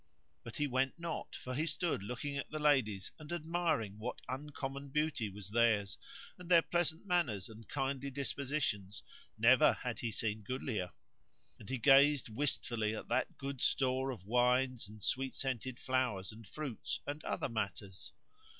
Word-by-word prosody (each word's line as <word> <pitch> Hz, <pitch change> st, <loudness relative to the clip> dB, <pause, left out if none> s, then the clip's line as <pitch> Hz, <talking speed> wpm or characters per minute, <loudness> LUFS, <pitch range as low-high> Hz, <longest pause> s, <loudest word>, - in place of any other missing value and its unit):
But 115 Hz, -, -8 dB
he 150 Hz, -, +2 dB
went 130 Hz, +1 st, +1 dB
not, 170 Hz, -1 st, -4 dB
for 130 Hz, -, -5 dB
he 155 Hz, +5 st, 0 dB
stood 155 Hz, -, 0 dB
looking 125 Hz, +7 st, -4 dB
at 140 Hz, -, -3 dB
the 155 Hz, -, -4 dB
ladies 130 Hz, -10 st, +2 dB
and 155 Hz, 0 st, -9 dB
admiring 160 Hz, -, 0 dB
what 120 Hz, +3 st, -4 dB
uncommon 140 Hz, 0 st, -5 dB
beauty 150 Hz, -6 st, 0 dB
was 100 Hz, 0 st, -8 dB
theirs, 110 Hz, -2 st, +3 dB, 0.4 s
and 180 Hz, -1 st, -10 dB
their 170 Hz, -2 st, +7 dB
pleasant 175 Hz, 0 st, 0 dB
manners 145 Hz, -, +1 dB
and 110 Hz, 0 st, -13 dB
kindly 135 Hz, -1 st, -1 dB
dispositions 135 Hz, -7 st, -2 dB, 0.3 s
(never -, -, +7 dB
had -, -, -4 dB
he 115 Hz, -, -1 dB
seen 110 Hz, 0 st, -1 dB
goodlier); 110 Hz, -4 st, -3 dB, 0.7 s
and -, -, -10 dB
he 130 Hz, -, 0 dB
gazed 140 Hz, +2 st, +6 dB
wistfully 110 Hz, -3 st, 0 dB
at -, -, -7 dB
that -, -, 0 dB
good 135 Hz, -1 st, -5 dB
store 130 Hz, 0 st, +2 dB
of 115 Hz, -8 st, -6 dB
wines 125 Hz, +1 st, +2 dB
and 105 Hz, -1 st, -12 dB
sweet 130 Hz, +3 st, 0 dB
scented 130 Hz, -1 st, -2 dB
flowers 125 Hz, -8 st, 0 dB
and 110 Hz, -1 st, -12 dB
fruits 140 Hz, -2 st, -4 dB
and 145 Hz, +2 st, -4 dB
other -, -, -1 dB
matters. 100 Hz, -4 st, -4 dB
130 Hz, 160 wpm, -35 LUFS, 110-145 Hz, 0.7 s, their